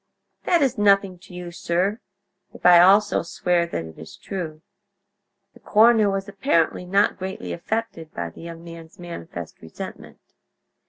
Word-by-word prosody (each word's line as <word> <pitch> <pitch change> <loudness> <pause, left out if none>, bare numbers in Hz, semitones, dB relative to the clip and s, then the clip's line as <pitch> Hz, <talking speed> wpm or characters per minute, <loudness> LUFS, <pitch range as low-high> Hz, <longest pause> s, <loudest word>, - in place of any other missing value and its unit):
"That 345 -4 +3
is 260 -4 0
nothing 195 -3 +3
to 185 0 -16
you, 175 -1 -7
sir, 180 +5 -1 0.6
if - - -14
I 175 -1 +9
also 200 +4 +5
swear 170 0 0
that 85 - -4
it 80 -1 -12
is 80 - -11
true." 165 -5 -6 0.9
The - - -18
coroner 220 -1 +4
was 195 0 -2
apparently 195 - 0
not 195 +3 +2
greatly 185 - -5
affected 190 - -4
by 85 -1 -5
the - - -14
young 165 0 -9
man's 165 -1 -12
manifest 170 - -8
resentment. 80 - -9
180 Hz, 150 wpm, -23 LUFS, 165-200 Hz, 0.9 s, I